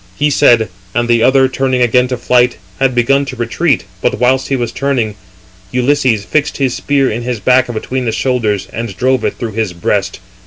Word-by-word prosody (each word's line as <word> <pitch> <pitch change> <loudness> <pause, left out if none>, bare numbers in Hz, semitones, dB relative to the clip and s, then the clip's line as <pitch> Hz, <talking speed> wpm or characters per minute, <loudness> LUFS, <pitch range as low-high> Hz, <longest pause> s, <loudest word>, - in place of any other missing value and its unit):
He 150 0 +1
said, 120 -7 +4 0.3
and 120 +1 +1
the 120 -1 +3
other, 130 +2 +4
turning 130 -1 0
again 125 +1 +3
to 125 0 -3
flight, 125 0 +2 0.2
had 135 -2 +1
begun 135 +4 +2
to 135 -1 -6
retreat, 125 +4 0 0.2
but - - 0
whilst 130 +1 +2
he 135 - 0
was 120 -3 -2
turning, 130 -6 -1 0.6
he - - -3
(Ulysses) 125 -5 +1
fixed 150 +5 -1
his 135 -3 0
spear 140 -2 0
in 115 +3 -3
his 120 -1 -3
back 125 +4 +2
between 125 +3 -3
the 115 - 0
shoulders, 110 -5 -1
and 115 0 -5
drove 130 -1 +1
it - - -1
through 115 -3 -4
his 110 -3 -2
breast. 95 +2 -2
125 Hz, 200 wpm, -14 LUFS, 115-130 Hz, 0.6 s, said